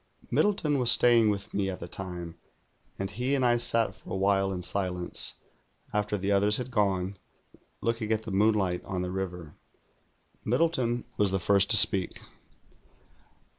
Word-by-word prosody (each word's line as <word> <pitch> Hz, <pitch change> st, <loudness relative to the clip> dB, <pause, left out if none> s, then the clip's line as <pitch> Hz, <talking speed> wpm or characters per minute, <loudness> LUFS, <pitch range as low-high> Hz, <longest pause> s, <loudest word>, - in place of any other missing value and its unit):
Aliddleton 160 Hz, -9 st, +1 dB
was 120 Hz, -1 st, +5 dB
staying 120 Hz, -3 st, +5 dB
with 100 Hz, -1 st, -4 dB
me 100 Hz, -1 st, -1 dB
at 95 Hz, -, -6 dB
the 85 Hz, -, -8 dB
time, 90 Hz, -2 st, -7 dB, 0.6 s
and 95 Hz, 0 st, -5 dB
he 125 Hz, +6 st, -2 dB
and 130 Hz, -2 st, 0 dB
I 120 Hz, -1 st, +3 dB
sat 115 Hz, -1 st, +1 dB
for -, -, -17 dB
a -, -, -3 dB
while 95 Hz, 0 st, +1 dB
in 90 Hz, -2 st, -5 dB
silence, 90 Hz, -2 st, -3 dB, 0.6 s
after 105 Hz, 0 st, -1 dB
the 100 Hz, +1 st, -3 dB
others 100 Hz, +1 st, +2 dB
had 125 Hz, 0 st, -6 dB
gone, 95 Hz, -4 st, -1 dB, 0.6 s
looking 115 Hz, -1 st, -2 dB
at 110 Hz, 0 st, -1 dB
the 110 Hz, -, -7 dB
moonlight 95 Hz, -3 st, +1 dB
on 90 Hz, -2 st, -4 dB
the 90 Hz, -, -5 dB
river. 90 Hz, -4 st, -6 dB, 0.9 s
Middle 150 Hz, +9 st, +1 dB
ton 120 Hz, -6 st, -2 dB
was 105 Hz, -1 st, +2 dB
the 95 Hz, -, -1 dB
first 100 Hz, +2 st, +2 dB
to 115 Hz, -, +10 dB
speak. 95 Hz, -2 st, +5 dB
100 Hz, 165 wpm, -27 LUFS, 95-115 Hz, 0.9 s, to